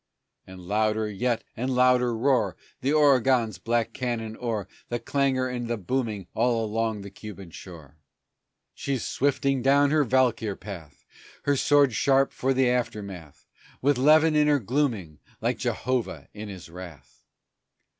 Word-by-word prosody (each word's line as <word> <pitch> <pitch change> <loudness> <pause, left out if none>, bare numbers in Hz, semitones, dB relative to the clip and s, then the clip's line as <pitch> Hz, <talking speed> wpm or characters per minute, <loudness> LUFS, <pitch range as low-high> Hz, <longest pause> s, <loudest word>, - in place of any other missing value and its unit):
And 95 0 -11
louder 110 +3 0
yet 115 +3 -1
and 125 +3 -2
louder 125 -2 +3
roar 120 -6 +1 0.2
The 135 +2 +1
Oregon's 130 -7 +3
black 115 0 -1
cannon 115 -3 -3
o'er 110 -5 -3 0.2
The 120 - -1
clangor 130 +1 0
and 120 -2 -4
the 120 0 -1
booming 110 -1 -2
all 115 -2 +1
along 110 0 -1
the 100 0 -9
Cuban 100 -3 -10
shore. 80 -5 -12 0.7
She's 135 -3 -3
swifting 140 -1 0
down 140 +2 +4
her 155 -1 +4
valkyr 120 -5 +1
path, 85 -9 -10 0.4
Her 145 - +2
sword 140 -1 +4
sharp 135 +4 +2
for 135 - 0
the 130 -1 +3
aftermath, 100 - -3 0.3
With 140 -1 +2
levin 155 +3 +5
in 150 0 +4
her 145 -1 +4
glooming, 115 - -1 0.2
like - - -1
Jehovah 125 -1 -2
in 105 0 -7
His 95 -3 -9
wrath. 85 -3 -12
120 Hz, 145 wpm, -26 LUFS, 105-135 Hz, 0.7 s, levin